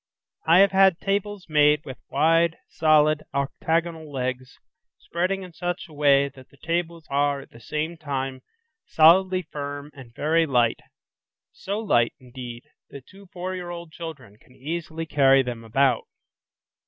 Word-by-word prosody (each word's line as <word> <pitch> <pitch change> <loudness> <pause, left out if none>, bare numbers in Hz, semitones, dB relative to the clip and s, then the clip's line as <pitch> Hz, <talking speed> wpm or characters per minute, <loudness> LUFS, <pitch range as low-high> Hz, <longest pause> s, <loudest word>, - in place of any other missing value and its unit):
I 165 +2 +6
have 200 - +5
had 190 -2 +5
tables 200 -1 -2
made 150 -1 +3
with 130 -3 -8
wide, 165 +1 +2
solid, 155 -1 +3
octagonal 160 +3 -1
legs, 130 -1 -4 0.4
spreading 185 +3 -2
in 180 -2 -11
such 175 +2 -4
a 160 - -16
way 140 -1 +4
that 130 -1 -16
the 140 - -22
tables 170 +1 -3
are 140 0 +1
at - - -16
the 115 - -15
same 150 +8 -4
time 135 -4 -4 0.5
solidly 185 +3 +5
firm 145 -1 -7
and 130 -5 -13
very 160 +2 +2
light, 120 -4 +2 0.7
so 200 +2 -5
light, 120 - +2
indeed, 125 -2 -9 0.3
that 135 -2 -11
two 195 0 -16
four 180 0 -5
year 180 -1 -6
old 170 -2 -8
children 155 -11 -9
can 125 - -23
easily 165 +3 -5
carry 135 -3 +4
them 120 -2 -6
about. 125 +2 +1
155 Hz, 150 wpm, -24 LUFS, 135-170 Hz, 0.7 s, I